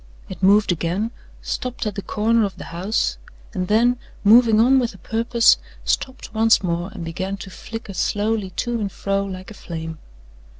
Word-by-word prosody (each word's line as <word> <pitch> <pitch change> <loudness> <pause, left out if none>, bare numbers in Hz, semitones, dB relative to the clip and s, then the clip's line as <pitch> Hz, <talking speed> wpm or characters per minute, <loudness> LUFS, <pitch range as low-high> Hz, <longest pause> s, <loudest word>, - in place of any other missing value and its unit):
It - - -8
moved 200 +1 +5
again, 175 +6 -1 0.3
stopped 250 -2 -3
at 210 - -1
the 200 - -4
corner 225 +3 +1
of 200 -2 -2
the - - -7
house, 190 +6 -1 0.3
and 185 -3 -2
then, 240 +4 +3 0.2
moving 220 +1 +6
on 260 +4 +5
with 235 -5 -2
a - - -12
purpose, 230 +4 +3 0.3
stopped 260 -4 -2
once 225 -1 +4
more 175 +1 -1
and 185 -6 -7
began 185 +4 -3
to 195 - -9
flicker 220 +1 -8
slowly 205 +1 0
to 235 +5 -2
and 200 -2 -2
fro 195 +2 -1
like 185 0 -7
a - - -8
flame. 160 -4 -7
210 Hz, 175 wpm, -22 LUFS, 185-225 Hz, 0.3 s, moving